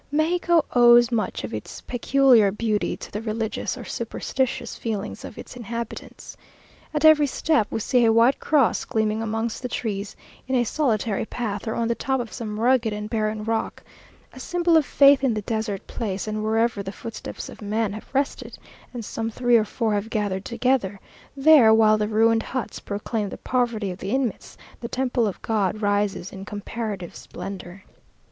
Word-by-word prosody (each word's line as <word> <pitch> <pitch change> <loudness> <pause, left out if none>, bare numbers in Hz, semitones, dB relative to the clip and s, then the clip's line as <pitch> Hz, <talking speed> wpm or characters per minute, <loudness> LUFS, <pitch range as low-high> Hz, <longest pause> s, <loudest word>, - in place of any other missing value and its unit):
Mexico 335 +2 +2
owes 240 -1 +6
much 225 -3 -1
of - - -6
its - - -6
peculiar 245 -4 +4
beauty 210 0 -1
to - - -10
the 210 - -4
religious 220 0 -3
or - - -8
superstitious 265 -1 -3
feelings 215 -2 -4
of - - -9
its - - -9
inhabitants. 235 -1 -7 0.6
At 305 0 0
every 305 -2 +7
step 285 -4 +1
we 225 - -3
see 245 +2 +3
a 225 - +5
white 230 +4 +4
cross 285 -6 +2
gleaming 220 0 -1
amongst 225 +1 -2
the 250 - -3
trees, 205 -4 -4 0.3
in 260 - 0
a 245 - +3
solitary 225 -6 0
path, 215 -3 -4
or 220 - -1
on 230 - 0
the 235 - +1
top 265 +2 -1
of 235 -2 -5
some 215 -3 -5
rugged 240 -1 +3
and 210 0 -5
barren 215 -1 -1
rock 225 0 -2 0.5
a - - -11
symbol 345 -1 +1
of 315 -3 +4
faith 280 -1 +6
in 250 -5 +2
the 210 - -3
desert 220 -2 -3
place; 200 -3 -4
and 215 0 -2
wherever 225 0 +1
the 195 -1 -5
footsteps 230 +2 -7
of - - -12
man 210 0 -1
have 215 - -9
rested, 275 +1 -2 0.4
and 235 -3 -5
some 225 +2 -3
three 245 +1 +2
or 220 -2 +4
four 220 0 -1
have 205 +2 -2
gathered 200 -3 -2
together, 235 -5 0 0.4
there, 275 -5 +7
while 215 -1 +5
the 210 - 0
ruined 225 +1 +3
huts 255 +2 -4
proclaim 205 +1 -3
the - - -7
poverty 235 -6 -1
of 180 - -8
the 195 - -5
inmates, 255 -3 -2 0.2
the 235 - -5
temple 250 -3 0
of 200 - -5
God 215 -2 0
rises 205 -2 0
in 190 0 -8
comparative 205 -2 -5
splendour. 195 0 -8
225 Hz, 180 wpm, -24 LUFS, 210-245 Hz, 0.6 s, every